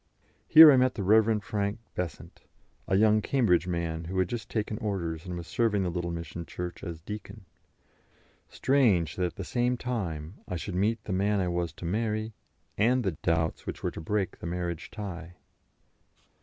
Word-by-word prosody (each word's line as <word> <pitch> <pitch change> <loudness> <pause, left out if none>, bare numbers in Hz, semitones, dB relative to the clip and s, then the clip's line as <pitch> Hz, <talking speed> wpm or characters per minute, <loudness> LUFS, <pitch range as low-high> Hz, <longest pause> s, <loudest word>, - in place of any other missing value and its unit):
Here 160 -1 +11
I 135 - +5
met 130 0 +3
the 100 - -3
Rev. 110 +1 +4
Frank 100 0 -2 0.2
Besant, 90 -4 -6 0.5
a 95 - +2
young 110 +1 +4
Cambridge 105 -9 +2
man, 85 -2 -2
who 95 +3 -4
had 95 -1 +1
just 120 -2 -5
taken 105 -1 -2
orders, 85 -5 -3
and 90 -1 -4
was 85 - -6
serving 105 0 +1
the 90 - -1
little 85 0 -3
mission 85 0 -5
church 90 +1 -7
as 85 -3 -6
deacon; 105 +2 -8 1.0
strange 110 - +2
that 90 -1 0
at - - -9
the 100 - -5
same 125 +5 0
time 95 -9 -4
I 90 - -3
should 90 +3 -5
meet 105 +5 0
the 100 - -4
man 100 +2 +1
I 90 -1 0
was 85 -1 -1
to 85 - -9
marry, 110 +3 -1 0.5
and 125 +4 +3
the 95 - 0
doubts 80 +1 -1
which - - -6
were - - 0
to - - -8
break 100 +2 -2
the - - -6
marriage 85 -1 -4
tie. 90 -5 -7
95 Hz, 185 wpm, -28 LUFS, 85-110 Hz, 1.0 s, Here